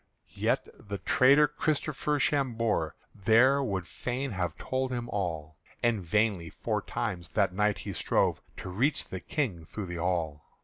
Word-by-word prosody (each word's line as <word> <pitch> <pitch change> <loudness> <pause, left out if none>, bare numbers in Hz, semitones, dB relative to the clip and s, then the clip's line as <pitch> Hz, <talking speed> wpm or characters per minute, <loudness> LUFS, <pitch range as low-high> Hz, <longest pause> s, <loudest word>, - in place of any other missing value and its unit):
Yet - - 0
the 100 0 -5
traitor 140 - +5
Christopher 150 0 -1
Chaumber 115 - +1 0.2
there 120 +7 +4
Would 95 -7 -2
fain 125 +8 -3
have 90 -4 -2
told 130 0 -2
him 120 -1 -3
all, 80 -6 -3 0.3
And 120 -3 +2
vainly 95 -1 +1
four - - -2
times 85 -2 -3
that 100 -4 +1
night 105 +1 +2
he - - -5
strove - - +1 0.2
To - - -6
reach 125 +12 +1
the 95 - -4
King 105 - -2
through 100 +5 -6
the 90 -1 -5
hall. 85 -5 -1
105 Hz, 150 wpm, -29 LUFS, 90-130 Hz, 0.3 s, traitor